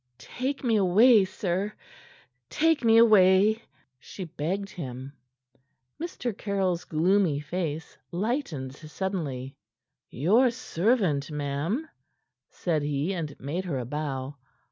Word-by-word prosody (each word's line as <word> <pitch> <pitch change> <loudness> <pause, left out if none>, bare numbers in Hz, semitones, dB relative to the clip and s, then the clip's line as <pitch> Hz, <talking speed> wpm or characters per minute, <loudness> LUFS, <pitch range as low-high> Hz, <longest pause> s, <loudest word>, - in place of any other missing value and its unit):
"Take 270 +3 -4
me 230 -3 +3
away, 205 +3 +6
sir! 190 +1 -2 0.8
Take 320 -2 +2
me 225 -1 +5
away," 215 -1 +6 0.4
she 190 - -8
begged 180 +4 -3
him. 130 -3 -7 0.9
Mr. 250 - -4
Caryll's 190 -4 -1
gloomy 170 -1 +2
face 155 0 -4
lightened 175 - -2
suddenly. 150 -5 -4 0.5
"Your 215 - +3
servant, 195 - 0
ma'am," 150 - -2 0.6
said 160 -4 -1
he, 145 +5 -1
and 155 -5 -5
made 165 +8 -3
her 155 -7 -2
a 125 - -3
bow. 140 0 -4
180 Hz, 105 wpm, -27 LUFS, 145-215 Hz, 0.9 s, away